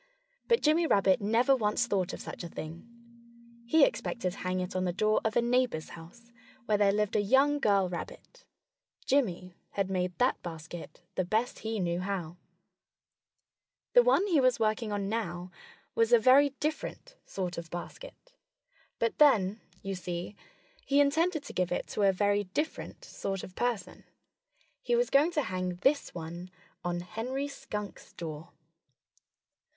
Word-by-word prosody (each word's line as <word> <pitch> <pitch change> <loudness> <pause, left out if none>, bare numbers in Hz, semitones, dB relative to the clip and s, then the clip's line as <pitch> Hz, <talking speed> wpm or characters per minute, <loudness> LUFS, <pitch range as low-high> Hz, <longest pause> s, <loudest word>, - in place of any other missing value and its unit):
But 465 0 +3
Jimmy 320 +2 +4
Rabbit 195 -5 +3
never 230 +6 +3
once 220 0 +1
thought 195 -5 0
of - - -7
such - - -7
a 170 - -6
thing. 165 +8 -8 0.8
He 315 +6 +6
expected 235 - -2
to - - -11
hang 185 0 -1
it 180 0 -4
on 185 - 0
the 180 - 0
door 215 +4 +2
of 220 -1 -1
a 235 - +3
neighbor's 240 -9 +1
house, 230 +9 -13 0.3
where 210 -2 +1
there 200 -1 +5
lived 210 0 0
a - - +4
young 270 +7 +3
girl 200 -7 +3
rabbit. 180 - -8 0.6
Jimmy 185 -10 0 0.2
had 195 -1 -1
made 180 -1 -1
that 250 +1 +2
basket 165 +1 -8
the 185 - 0
best 220 +7 -1
he 220 -1 -3
knew 175 -1 0
how. 180 -3 -4 1.6
The - - +8
one 485 -5 +3
he 345 -7 +3
was 255 -2 +3
working 215 0 0
on 200 -1 -2
now 180 -5 -3 0.4
was 230 0 +2
a 240 - +8
very 260 +5 +6
different 315 +11 -4
sort 180 -3 -4
of 165 -1 -9
basket. - - -9 0.6
But 230 -1 -1
then 220 -8 +5 0.2
you 195 0 -3
see, 180 +1 -5 0.5
he 280 +1 +2
intended 310 +3 +2
to - - -9
give 180 -1 0
it - - -1
to - - -3
a 200 -1 +5
very 205 +1 +1
different 300 - -4
sort 195 - -4
of 185 - -9
person. 240 -4 -2 0.8
He 485 -1 +1
was 485 +1 +1
going 285 +4 +5
to 300 -3 +1
hang 185 -2 -3
this 280 +1 +2
one 170 +2 -7 0.3
on 175 0 -2
Henry 250 +9 -4
Skunk's 210 -7 -7
door. 160 -1 -7
210 Hz, 160 wpm, -30 LUFS, 180-265 Hz, 1.6 s, The